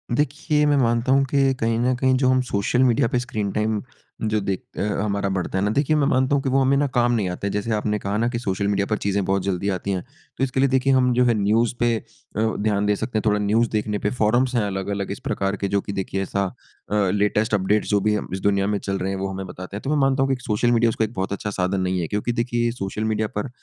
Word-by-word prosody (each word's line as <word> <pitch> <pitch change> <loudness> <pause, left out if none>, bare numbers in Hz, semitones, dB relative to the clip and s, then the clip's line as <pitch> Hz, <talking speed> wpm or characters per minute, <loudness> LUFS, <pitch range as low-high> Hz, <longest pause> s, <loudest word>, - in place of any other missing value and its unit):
देखिए, 150 +2 +1
मैं 145 -1 +3
मानता 120 -1 +2
हूँ 135 +1 +5
कि 135 0 +2
कहीं 115 0 +1
न 125 +2 +2
कहीं 130 +1 +2
जो 130 0 +2
हम 130 0 +3
सोशल 105 +5 +2
मीडिया 125 0 +3
पे 125 - 0
स्क्रीन 110 -5 -3
टाइम 105 0 0 0.4
जो 110 -1 +1
देख 95 -1 -2 0.2
अ, - - -2 0.2
हमारा 100 -1 -1
बढ़ता 95 0 -2
है 95 - +1
ना? 105 - +1
देखिए 140 +6 +1
मैं 145 -2 +2
मानता 130 0 +2
हूँ 140 - +1
कि 135 - 0
वो 135 +1 +3
हमें 135 +1 +3
ना 145 - +2
कम 120 0 +3
नहीं 110 -5 +1
आता। 90 +2 -4
जैसे 105 +3 -2
आपने 105 0 0
कहा 100 +1 -3
ना 115 +2 +1
कि 120 -1 -3
सोशल 100 -3 -1
मीडिया 100 0 +1
पर 105 - 0
चीज़ें 100 0 -1
बहुत 95 0 0
जल्दी 95 +1 -1
आती 95 +1 -2
हैं, 95 -2 -2 0.3
तो - - 0
इसके 130 0 -1
लिए 135 +1 +4
देखिए 135 +1 +2
हम 125 -1 +3
जो 125 +1 +3
है 120 - +4
न्यूज़ 110 +4 +2
पे 120 -1 +2
अ, - - -7 0.4
ध्यान 105 -2 0
दे 105 0 +2
सकते 110 +2 -3
हैं। 110 - -1
थोड़ा 105 -1 +2
न्यूज़ 110 +3 +2
देखने 105 -1 -1
पे - - +3
फ़ोरम्स 120 +4 +2
हैं 120 - +3
अलग-अलग 100 0 -3
इस 100 - -5
प्रकार 100 0 -1
के 100 - -2
जो 100 - +2
कि 100 - -6
देखिए 95 0 -2
ऐसा 100 +1 -1 0.5
अ, - - +1 0.2
लेटेस्ट 105 +2 +1
अपडेट 100 +2 +2
जो 105 - +2
भी 105 +1 +2
हम 105 - -3
इस 95 - -2
दुनिया 100 -1 +2
में 105 0 0
चल 95 0 -3
रहे 95 +1 -2
हैं 95 - -3
वो 95 - -2
हमें 95 0 -5
बताते 90 +2 -7
हैं। - - -7
तो 135 - -4
मैं 150 - +2
मानता 135 0 +2
हूँ 135 - 0
कि 125 - -12
सोशल 115 +2 +1
मीडिया 115 -1 +3
उसका 110 0 0
एक 110 - -9
बहुत 95 -1 -2
अच्छा 105 - -4
साधन 95 +1 +1
नहीं 95 0 0
है। 85 - -2
क्योंकि 105 +6 -1
देखिए 120 0 0
सोशल 105 -2 -4
मीडिया 110 0 0
पर 105 +6 -2
105 Hz, 275 wpm, -23 LUFS, 100-125 Hz, 0.5 s, हूँ